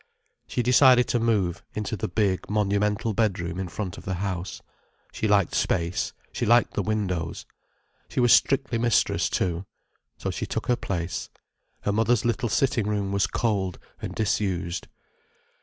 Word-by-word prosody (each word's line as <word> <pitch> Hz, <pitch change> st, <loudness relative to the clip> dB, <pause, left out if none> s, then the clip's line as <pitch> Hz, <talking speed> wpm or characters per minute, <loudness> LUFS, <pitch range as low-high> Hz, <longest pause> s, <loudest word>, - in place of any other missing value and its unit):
She 125 Hz, -, -1 dB
decided 125 Hz, 0 st, +6 dB
to 120 Hz, -, +2 dB
move 105 Hz, -7 st, +1 dB
into 105 Hz, +1 st, -2 dB
the 100 Hz, -, -3 dB
big, 95 Hz, -1 st, 0 dB
monumental 105 Hz, +2 st, +1 dB
bedroom 95 Hz, -5 st, -1 dB
in 95 Hz, -, -2 dB
front 95 Hz, 0 st, -5 dB
of -, -, -13 dB
the 95 Hz, -, -2 dB
house. 95 Hz, -1 st, -3 dB, 0.5 s
She 110 Hz, -, -2 dB
liked 100 Hz, -4 st, +3 dB
space, 85 Hz, 0 st, 0 dB, 0.2 s
she -, -, -3 dB
liked 120 Hz, +1 st, +4 dB
the -, -, 0 dB
windows. 90 Hz, -5 st, -2 dB, 0.6 s
She -, -, -2 dB
was 120 Hz, -1 st, +6 dB
strictly 135 Hz, -4 st, +3 dB
mistress, 120 Hz, -1 st, +2 dB
too. 90 Hz, +1 st, -1 dB, 0.5 s
So -, -, -3 dB
she -, -, -4 dB
took -, -, -3 dB
her 125 Hz, -, +5 dB
place. 90 Hz, -7 st, -3 dB, 0.5 s
Her 100 Hz, -, 0 dB
mother's 115 Hz, +2 st, +2 dB
little 120 Hz, 0 st, 0 dB
sitting 130 Hz, -6 st, +1 dB
room 100 Hz, -2 st, -1 dB
was 100 Hz, -1 st, +2 dB
cold 100 Hz, -5 st, -1 dB, 0.2 s
and -, -, -5 dB
disused. 95 Hz, -4 st, -1 dB
105 Hz, 155 wpm, -26 LUFS, 95-115 Hz, 0.6 s, decided